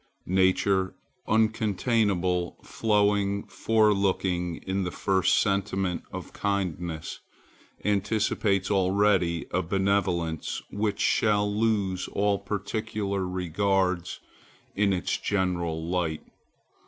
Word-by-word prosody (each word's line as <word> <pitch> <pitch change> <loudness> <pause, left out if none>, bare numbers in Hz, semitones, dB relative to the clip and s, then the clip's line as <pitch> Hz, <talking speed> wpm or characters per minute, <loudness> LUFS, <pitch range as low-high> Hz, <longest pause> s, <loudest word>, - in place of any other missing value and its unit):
Nature, 95 0 +2 0.3
uncontainable, 105 -4 +1
flowing, 100 -2 +1
forelooking, 100 -5 +1
in 95 0 -1
the 90 - -2
first 95 -1 +2
sentiment 95 -3 0
of - - -7
kindness 90 -5 -3 0.7
anticipates 100 -1 +1
already 95 -3 +2
a 90 - +1
benevolence 95 -3 0
which 105 0 -1
shall 105 -1 +2
lose 105 -4 0
all 100 0 +1
particular 100 -1 -3
regards 90 0 0 0.6
in 100 0 +2
its 90 -3 0
general 85 -4 -1
light. 85 -3 -1
95 Hz, 85 wpm, -27 LUFS, 90-105 Hz, 0.7 s, Nature